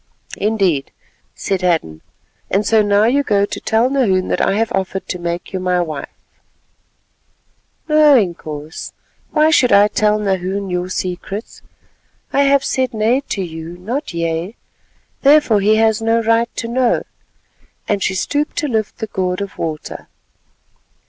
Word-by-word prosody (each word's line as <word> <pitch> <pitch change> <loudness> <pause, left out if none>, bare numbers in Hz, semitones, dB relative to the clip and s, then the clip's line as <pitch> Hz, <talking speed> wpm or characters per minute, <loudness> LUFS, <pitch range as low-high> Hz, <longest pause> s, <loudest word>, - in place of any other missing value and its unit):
"Indeed," 195 -10 0 0.5
said 190 -2 -2
Hadden; 160 - 0 0.5
"and 200 +2 +1
so 220 +1 +4
now 205 0 +3
you 255 +6 +3
go 205 -7 +2
to - - -6
tell 225 +2 +2
Nahoon 220 -9 +1
that - - 0
I - - +2
have 225 +1 0
offered 190 -1 -2
to 180 - -3
make 170 +2 -4
you 190 - -2
my 180 -1 0
wife." 155 -5 -4 1.8
"No, 305 -2 +6
Inkoos, 160 -6 -4 0.4
why 310 0 +3
should 255 -5 +4
I 205 +1 +6
tell 210 0 +1
Nahoon 195 -1 -2
your 180 0 -2
secrets? 185 +4 -5 0.7
I 280 - +3
have 275 0 +3
said 260 -3 -1
'nay' 225 +5 +2
to 195 - -2
you, 165 0 -7
not 240 - -4
'yea,' 170 +4 -3 0.7
therefore 280 -7 +5
he 215 +2 +4
has 220 0 +2
no 225 +1 +1
right 230 +1 +2
to 230 - -3
know," 245 0 +1 0.8
and 205 -1 0
she 190 - 0
stooped 290 +10 -1
to 300 - 0
lift 220 -5 -2
the 220 - -3
gourd 185 -3 -2
of 200 -1 -5
water. 155 -2 -5
205 Hz, 150 wpm, -18 LUFS, 180-230 Hz, 1.8 s, No